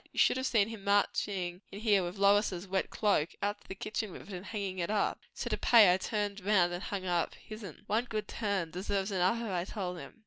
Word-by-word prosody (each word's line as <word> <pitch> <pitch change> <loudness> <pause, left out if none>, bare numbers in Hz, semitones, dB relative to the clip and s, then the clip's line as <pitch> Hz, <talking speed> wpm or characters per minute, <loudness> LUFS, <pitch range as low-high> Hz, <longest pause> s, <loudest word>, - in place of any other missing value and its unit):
You - - -17
should - - +4
have 260 0 0
seen 215 -4 +3
him 225 -3 -8
marching 195 -2 0
in 200 - -7
here 210 -4 +3
with 175 +2 -5
Lois's 200 -2 +3
wet 190 0 -1
cloak, 200 -7 +1
out 205 0 -1
to - - -21
the 190 - -6
kitchen 215 +1 -3
with - - -9
it, - - -6
and 185 +2 -7
hangin' 200 -4 -3
it 170 - -1
up. 210 -1 +1 0.2
So - - -4
to - - +1
pay, 215 -7 +7
I - - +2
turned 205 0 -2
round 185 -4 +3
and 175 - -4
hung 195 -2 -4
up 175 -2 0
his'n. 215 -6 -10
One 225 +4 +1
good 215 -3 -3
turn 200 -7 -2
deserves 195 +2 -2
another, 195 +3 +1
I 175 -1 0
told 180 -2 -4
him. - - -11
200 Hz, 235 wpm, -32 LUFS, 185-210 Hz, 0.2 s, pay